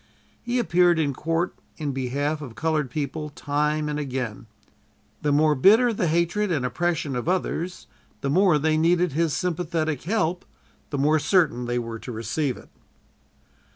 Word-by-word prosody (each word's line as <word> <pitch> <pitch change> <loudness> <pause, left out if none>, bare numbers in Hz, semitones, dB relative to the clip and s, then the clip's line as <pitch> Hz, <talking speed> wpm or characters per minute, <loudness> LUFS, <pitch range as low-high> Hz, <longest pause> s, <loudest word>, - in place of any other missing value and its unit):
He 240 +1 -2
appeared 180 -6 +3
in 145 -3 +1
court 165 +5 -1 0.2
in 150 -3 -2
behalf 140 +4 -2
of 125 -6 -8
colored 155 -4 0
people, 150 +3 -4
time 150 +1 -1
and 150 0 -2
again. 130 -4 -4 0.7
The 150 - +1
more 150 +1 +4
bitter 220 - +5
the 185 -4 0
hatred 170 +5 +1
and 145 -7 0
oppression 160 -1 -1
of 125 +7 -2
others, 180 -1 -2 0.4
the 140 - -1
more 180 -1 +4
they 155 +1 +1
needed 175 +1 +3
his 160 +1 0
sympathetic 165 -4 -1
help, 180 -3 0 0.5
the 145 - -3
more 150 +3 +3
certain 150 -7 +2
they 120 0 -1
were 115 -1 -4
to 125 - -7
receive 120 +5 -2
it. - - -15
155 Hz, 155 wpm, -24 LUFS, 140-175 Hz, 0.7 s, bitter